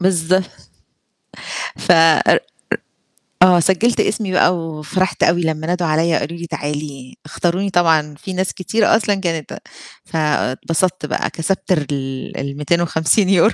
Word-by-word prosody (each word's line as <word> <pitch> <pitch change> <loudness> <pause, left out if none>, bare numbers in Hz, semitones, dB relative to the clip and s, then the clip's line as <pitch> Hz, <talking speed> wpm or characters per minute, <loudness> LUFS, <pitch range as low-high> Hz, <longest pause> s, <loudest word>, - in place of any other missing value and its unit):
بالضب 185 0 +2 1.3
فإ 175 - +3 0.4
إ - - +2 1.0
آه، 180 -1 +6
سجلت 190 +7 +2
اسمي 205 -4 0
بقى، 180 -1 +3
وفرحت 165 +3 -2
أوي 175 +1 +3
لما 160 -1 -2
نادوا 175 -1 0
عليّا، 160 +1 +2
وقالوا 170 +4 -4
لي 170 - -6
تعالي، 145 -4 -5
اختاروني، 175 +5 -1
طبعًا 160 -5 +2
في 190 +5 -7
ناس 185 +1 -1
كتيرة 215 +4 +1
أصلًا 205 -2 0
كانت 165 -5 -4 0.5
فاتبسطت 160 +3 -1
بقى، - - -2
كسبت 190 +4 -3
ر 155 -5 +2
ال 135 -2 -5
ال250€ 170 +7 +2
170 Hz, 125 wpm, -18 LUFS, 155-185 Hz, 1.3 s, آه